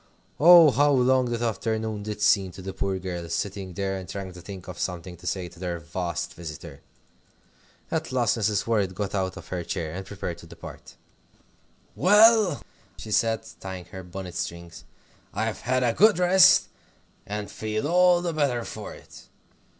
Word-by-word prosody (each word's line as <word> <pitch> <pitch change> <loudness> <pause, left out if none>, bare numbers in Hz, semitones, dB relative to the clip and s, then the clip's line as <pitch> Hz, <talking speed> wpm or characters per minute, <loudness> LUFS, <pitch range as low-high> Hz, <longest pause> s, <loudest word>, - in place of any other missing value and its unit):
Oh, 170 -1 +9
how 145 +3 +3
long 130 0 +3
that 120 -1 -2
afternoon 110 -1 -2
did 105 0 -6
seem 95 -3 +3
to 95 - -10
the 95 0 -5
poor 95 0 -2
girls, 90 -2 -4
sitting 95 -2 -4
there 95 +1 -2
and 95 -2 -9
trying 95 -2 -6
to 90 - -11
think 95 +1 -9
of 90 -1 -8
something 90 0 -4
to 90 +1 -10
say 95 -1 -2
to 85 0 -15
their 90 -2 -3
vast 85 +1 -4
visitor! 80 -3 -9 1.1
At 120 - -2
last 125 -3 +2
Mrs. 105 -3 0
Worrett 100 -5 0
got 100 0 -3
out 95 -2 -2
of - - -11
her 90 -2 -3
chair, 80 -3 -4
and 95 +2 -5
prepared 95 -3 -6
to 85 - -13
depart. - - -12 1.0
"Well," 210 -3 +5 0.3
she 110 - -9
said, 110 +1 +1
tying 95 -2 -7
her 95 - -7
bonnet 90 0 -8
strings, 85 -1 -6 0.5
"I've 110 +1 -2
had 130 +1 0
a 120 -2 +2
good 210 - +5
rest, 180 +1 +6 0.6
and 105 0 -5
feel 110 +4 -3
all 180 +1 +4
the 170 -2 -2
better 135 -6 0
for - - -8
it. - - -15
100 Hz, 175 wpm, -25 LUFS, 90-125 Hz, 1.1 s, Oh